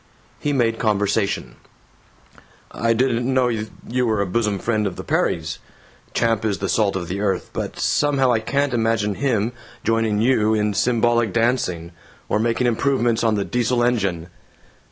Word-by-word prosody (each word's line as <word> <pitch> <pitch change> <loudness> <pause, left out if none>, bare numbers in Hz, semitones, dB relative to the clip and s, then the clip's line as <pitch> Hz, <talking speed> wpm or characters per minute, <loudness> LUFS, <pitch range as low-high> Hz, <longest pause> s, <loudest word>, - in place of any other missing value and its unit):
He 145 - -1
made 115 -5 +1
conversation: 100 - 0 1.1
"I 115 0 0
didn't 120 +1 +1
know 130 -1 +2
you 115 +2 -3
were 110 -2 +1
a 100 - +1
bosom 105 +1 0
friend 110 0 0
of 90 - -5
the - - -7
Perrys. 80 -1 -1 0.6
Champ 115 -2 +1
is 105 -3 0
the 100 - -3
salt 100 +2 +1
of 90 -3 -3
the 95 +4 -3
earth 100 -3 -1
but - - -4
somehow 140 -3 +2
I 115 - +2
can't 140 +4 -1
imagine 110 -3 +1
him 115 -3 0 0.3
joining 115 -2 +1
you 110 -2 +3
in 105 -1 0
symbolic 120 0 +2
dancing, 115 -8 0 0.4
or 105 - +1
making 115 +2 +1
improvements 120 -1 +1
on 110 -2 +2
the 100 -1 -1
Diesel 125 0 0
engine." 100 -8 0
115 Hz, 155 wpm, -21 LUFS, 100-120 Hz, 1.1 s, you